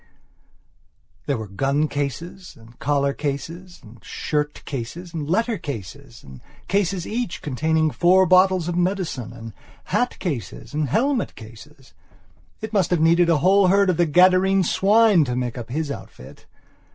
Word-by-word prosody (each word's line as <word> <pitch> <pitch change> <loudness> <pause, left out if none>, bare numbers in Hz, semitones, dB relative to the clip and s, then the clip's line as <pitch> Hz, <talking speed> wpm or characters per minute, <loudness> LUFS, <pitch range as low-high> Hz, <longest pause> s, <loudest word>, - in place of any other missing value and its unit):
There 140 -3 0
were 110 -1 -6
gun 140 +10 0
cases, 165 +6 -5
and 115 +1 -18
collar 140 -1 0
cases, 165 +6 -6
and 110 0 -16
shirt 150 -1 -3
cases, 155 +7 -6
and 155 -3 -5
letter 225 +3 0
cases 120 - -8
and 65 -2 -13 0.3
cases 195 -3 0
each 230 -4 -4
containing 155 +3 0
four 185 +4 +4
bottles 185 -1 +4
of 175 - -2
medicine; 180 - -2
and 115 -2 -10 0.3
hat 245 - -1
cases 145 - -5
and 150 -2 -1
helmet 250 - 0
cases. 115 - -14 0.7
It 220 0 -6
must 190 -4 +2
have 175 - +1
needed 170 +2 +4
a 165 - +4
whole 195 0 +5
herd 195 0 +4
of 170 - -3
the 175 - +2
Gadarene 185 +3 +4
swine 205 0 +4
to 125 -1 -3
make 125 -2 -3
up 120 -1 -7
his 150 +3 -3
outfit. 65 - -11
160 Hz, 150 wpm, -22 LUFS, 135-185 Hz, 0.7 s, whole